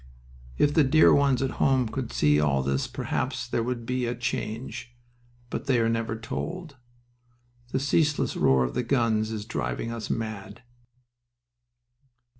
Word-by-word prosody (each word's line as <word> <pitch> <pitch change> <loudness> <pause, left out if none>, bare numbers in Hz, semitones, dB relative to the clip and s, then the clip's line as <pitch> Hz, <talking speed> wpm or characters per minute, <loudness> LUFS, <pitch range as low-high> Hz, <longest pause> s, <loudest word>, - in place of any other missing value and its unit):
"If 145 - +3
the 155 - +5
dear 145 +4 +6
ones 140 -2 +3
at 135 - -1
home 130 -3 +3
could 125 +1 -4
see 75 0 +3
all 70 -3 +2
this 70 0 0
perhaps - - -3
there - - -1
would 120 0 -3
be 125 0 -1
a 120 - -2
change. 120 +1 -4 0.5
But - - -4
they 130 -3 +3
are 115 0 +2
never 115 -1 -1
told." 155 +6 -5 0.9
"The 135 - 0
ceaseless 150 +1 +1
roar 65 -1 +3
of - - -2
the - - 0
guns 115 -4 +1
is 110 -2 -5
driving 65 - -3
us 115 -2 -5
mad." 110 0 -5
115 Hz, 150 wpm, -26 LUFS, 110-135 Hz, 0.9 s, dear